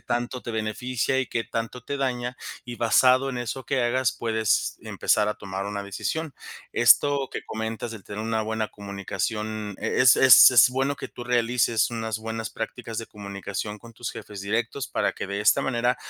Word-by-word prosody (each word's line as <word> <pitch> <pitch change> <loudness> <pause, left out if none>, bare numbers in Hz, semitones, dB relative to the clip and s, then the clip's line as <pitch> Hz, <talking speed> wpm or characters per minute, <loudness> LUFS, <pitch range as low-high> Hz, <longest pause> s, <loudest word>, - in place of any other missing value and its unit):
tanto 120 +1 -3
te 115 - -5
beneficia 115 +4 -1
y 130 - 0
qué 115 - -2
tanto 115 +2 -5
te 140 +3 -4
daña 125 -2 -2 0.3
y 120 -1 -7
basado 130 +3 +4
en 125 - -4
eso 120 +2 -4
que 130 +1 0
hagas, 125 +1 +1
puedes 110 -2 0
empezar 105 -1 +1
a 105 - -1
tomar 95 0 -5
una 100 0 -4
decisión. 145 +10 -4 0.4
Esto 135 +3 +4
que - - -4
comentas 110 +1 -4
de 110 -2 -8
tener 100 +3 -7
una 110 0 -1
buena 110 0 -2
comunicación, 105 +1 -4
eh, - - -2
es 125 -2 +7
es 130 0 +9
es 120 -1 +7
bueno 135 +2 0
que - - -7
tú 120 - -9
realices 120 -2 +2
unas 110 -2 -3
buenas 110 0 -4
prácticas 115 0 -6
de 115 - -4
comunicación 100 0 -6
con 115 +2 -14
tus 120 +1 -6
jefes 105 -2 -9
directos 115 +5 -2
para - - 0
que - - -6
de 100 +1 -3
esta 105 - +4
manera 125 -1 +1
115 Hz, 185 wpm, -25 LUFS, 110-125 Hz, 0.4 s, es